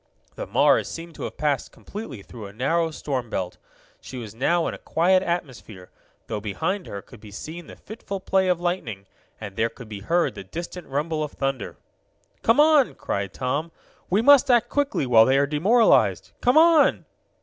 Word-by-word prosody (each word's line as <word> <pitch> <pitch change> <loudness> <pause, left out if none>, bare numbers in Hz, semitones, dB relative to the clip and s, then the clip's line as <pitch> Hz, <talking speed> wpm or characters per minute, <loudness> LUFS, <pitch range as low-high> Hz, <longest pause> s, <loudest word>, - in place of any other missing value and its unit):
The - - -6
Mars - - +3
seemed 165 0 -8
to - - -6
have - - -8
passed 145 -3 -1
completely 200 - -9
through 110 -2 -10
a 100 - -13
narrow 160 +9 0
storm 135 -6 -4
belt. 90 -4 -4 0.4
She 130 - -9
was 110 -4 -7
now 165 +9 +1
in - - -2
a - - -9
quiet 185 +3 +2
atmosphere, 130 - -5 0.3
though 105 - -4
behind 165 - -3
her 100 -1 -7
could 125 - -15
be 105 - -12
seen 160 +11 -8
the - - -11
fitful 200 -2 -7
play 190 0 +1
of 180 -2 +1
lightning, 175 - -3 0.3
and 100 -3 -8
there 115 +1 +1
could 115 0 -12
be 105 -2 -6
heard 170 - 0
the - - -8
distant 175 +1 -7
rumble 155 +3 -2
of 150 - -6
thunder. 135 -5 -3 0.6
"Come 230 +5 +3
on!" 300 -3 +5
cried 100 -1 -3
Tom. 140 +8 -3 0.4
"We 205 +5 +2
must 285 0 +6
act 240 -2 +4
quickly, 285 - 0
while 115 -3 +6
they 130 +2 +3
are 140 - +3
demoralized! 195 - +3
Come 245 +4 +3
on!" 325 -2 +5
155 Hz, 185 wpm, -24 LUFS, 115-190 Hz, 0.6 s, must